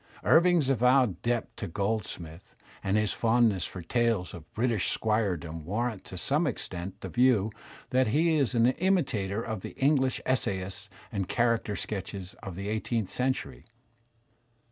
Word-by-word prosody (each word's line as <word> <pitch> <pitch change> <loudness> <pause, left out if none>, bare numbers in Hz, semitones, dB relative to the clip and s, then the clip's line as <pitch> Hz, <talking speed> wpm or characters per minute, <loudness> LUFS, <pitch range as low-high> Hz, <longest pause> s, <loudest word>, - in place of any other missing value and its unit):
Irving's 170 -3 +5
avowed 125 -6 +3
debt 120 -1 -1
to 105 - -4
Goldsmith 95 -3 -4 0.3
and 95 +2 +1
his 105 -1 +1
fondness 115 -5 +2
for 90 - -8
tales 115 -2 0
of 85 -2 -11
British 115 -4 +1
squiredom 90 -8 -1
warrant 105 +4 -2
to 95 - -8
some 150 - +1
extent 95 -6 -4
the - - -5
view 120 -4 +3 0.4
that 130 -1 +3
he 160 +8 +3
is 135 -2 +1
an 115 0 +4
imitator 130 - +1
of 110 -4 -4
the - - -8
English 135 -2 +2
essayists 100 -5 -1 0.2
and 100 -4 -2
character 115 -3 +1
sketchers 100 -1 -5
of 95 -5 -7
the 100 +2 -5
eighteenth 110 -1 -1
century. 130 +1 -2
110 Hz, 145 wpm, -29 LUFS, 95-125 Hz, 0.4 s, Irving's